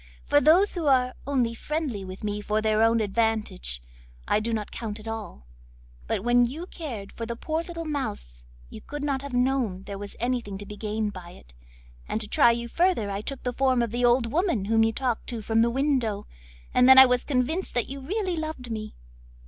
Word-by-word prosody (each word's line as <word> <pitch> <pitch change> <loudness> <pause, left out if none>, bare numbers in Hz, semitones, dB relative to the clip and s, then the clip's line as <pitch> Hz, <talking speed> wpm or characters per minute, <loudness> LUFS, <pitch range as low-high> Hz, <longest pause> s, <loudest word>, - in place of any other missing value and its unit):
'For 290 - +4
those 350 +8 +5
who 335 -4 -2
are 255 -2 +3
only 250 -5 +1
friendly 275 -5 -3
with 185 +1 -9
me 210 0 -2
for 210 +1 0
their 215 0 +2
own 225 0 +4
advantage, 210 - -1 0.4
I - - +3
do 225 +2 -2
not 215 -2 -3
count 220 -2 -5
at 215 - -11
all. 225 - -6 0.6
But 190 - -1
when 240 +1 +4
you 300 +9 -5
cared 245 - -7
for 230 - -6
the 235 - -3
poor 315 +6 -2
little 335 -1 -6
mouse - - -4 0.3
you - - -9
could 295 0 -6
not 275 -2 -1
have 280 -2 -7
known 245 -7 0
there 200 -1 -7
was 205 0 -8
anything 240 -5 -2
to 205 - -8
be 210 - -8
gained 210 0 -2
by 175 -2 -9
it, - - -17 0.5
and - - -1
to 215 - -6
try 225 - +5
you 235 0 0
further 335 - +1
I 200 +1 -3
took 270 +4 -6
the 250 - -2
form 260 -1 +2
of 230 - -3
the 240 +1 -1
old 240 0 +4
woman 330 - +1
whom 225 +1 +3
you 225 - +3
talked 245 -1 -2
to 230 -3 -5
from 225 +1 +2
the 235 - +4
window, 250 -6 0 0.5
and 250 +1 +5
then 265 - +9
I 265 - +12
was 250 -1 +1
convinced 290 +7 -1
that 245 - +1
you 275 +1 -6
really 370 +6 -2
loved 315 -7 -5
me. 215 -1 -5
235 Hz, 215 wpm, -26 LUFS, 215-275 Hz, 0.6 s, I